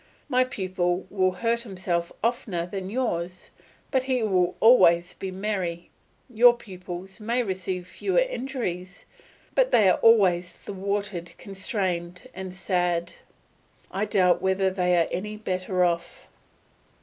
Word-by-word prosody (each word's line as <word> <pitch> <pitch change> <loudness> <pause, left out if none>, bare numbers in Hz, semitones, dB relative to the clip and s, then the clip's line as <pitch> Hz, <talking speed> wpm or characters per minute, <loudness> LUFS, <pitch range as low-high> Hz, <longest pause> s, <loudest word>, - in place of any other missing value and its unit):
My 255 -3 +3
pupil 185 -6 -2
will 185 -2 +2
hurt 230 +4 0
himself 185 -6 -3
oftener 225 -8 -1
than 190 +1 -5
yours, 185 -7 -3 0.4
but 265 - +3
he 255 -2 0
will 185 -4 +1
always 175 -7 +5
be 190 - -6
merry; 185 -3 -3 0.4
your 240 0 +6
pupils 185 -2 -9
may 235 +3 0
receive 185 -3 -3
fewer 380 - -2
injuries, 255 - -2 0.5
but - - +3
they 215 - +5
are 185 - +4
always 185 -6 +4
thwarted, 200 -2 -4
constrained, 185 0 -3
and 190 -1 -6
sad. 175 -2 -1 0.8
I 195 +3 -1
doubt 180 -4 +3
whether 190 0 +1
they 180 -1 +2
are 165 - +3
any 210 +3 -4
better 185 -2 0
off. 170 -1 -3
190 Hz, 125 wpm, -26 LUFS, 180-220 Hz, 0.8 s, your